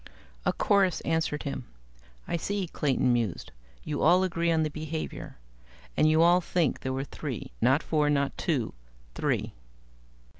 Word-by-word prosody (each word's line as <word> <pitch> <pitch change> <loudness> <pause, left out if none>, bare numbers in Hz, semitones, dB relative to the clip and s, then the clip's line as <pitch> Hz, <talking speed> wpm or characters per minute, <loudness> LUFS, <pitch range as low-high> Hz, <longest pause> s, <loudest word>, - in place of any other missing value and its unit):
A - - +5
chorus 195 -3 +2
answered 160 -2 -1
him. 140 - -4 0.6
"I - - -1
see," 195 +3 -1
Clayton 135 -6 +1
mused. 115 -7 -2 0.3
"You 150 -2 -3
all 180 +3 +5
agree 170 -2 0
on 160 -1 +2
the 155 - -1
behavior. 155 - -5 0.6
And 155 - +4
you 160 +1 +5
all 175 +1 +5
think 170 -4 0
there 130 - -3
were 135 +1 -2
three 140 - -6
not 135 +5 +4
four 150 -2 +1
not 140 -1 +1
two. 140 - -1 0.4
Three?" - - -1
155 Hz, 150 wpm, -28 LUFS, 140-170 Hz, 0.6 s, A